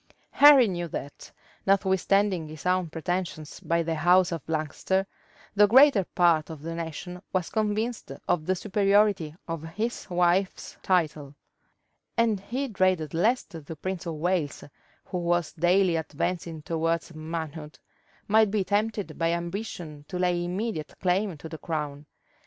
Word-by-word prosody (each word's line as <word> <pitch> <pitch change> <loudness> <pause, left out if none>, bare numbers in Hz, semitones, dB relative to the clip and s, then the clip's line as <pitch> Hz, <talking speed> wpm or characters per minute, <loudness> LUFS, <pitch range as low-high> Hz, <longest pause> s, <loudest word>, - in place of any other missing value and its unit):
Henry 285 -4 +8
knew 175 -3 -3
that, 145 -2 -7 0.4
notwithstanding 195 -2 +2
his 155 +1 -10
own 180 -2 +1
pretensions 160 -1 -4
by 170 0 0
the 165 0 -2
house 180 +3 +4
of 165 -3 -3
Lancaster, 160 +5 -1 0.5
the 205 0 +6
greater 255 -3 +6
part 170 -3 +3
of 155 -2 -9
the 165 +1 -4
nation 170 +2 -6
was 185 -3 -1
convinced 220 - -1 0.2
of 155 -2 0
the 185 - +2
superiority 200 -4 +2
of 165 -2 -4
his 210 +9 -4
wife's 180 +2 +1
title; 155 -6 0 0.8
and 225 -3 +2
he 250 +8 -3
dreaded 185 - +1
lest 215 +8 +1
the 160 -2 -8
prince 185 +2 -5
of 165 - -3
Wales, 165 -2 -1 0.4
who 180 - -4
was 175 -1 0
daily 175 +1 +3
advancing 160 +1 -3
towards 165 +1 -1
manhood, 155 -1 -6 0.5
might 220 0 +4
be 205 -1 0
tempted 210 +1 -1
by 165 0 +2
ambition 170 -3 -5
to 180 - -5
lay 180 -1 +1
immediate 180 -2 -3
claim 185 -1 0
to 155 - -9
the 160 -1 -8
crown. 150 -2 -4
175 Hz, 140 wpm, -27 LUFS, 160-195 Hz, 0.8 s, Henry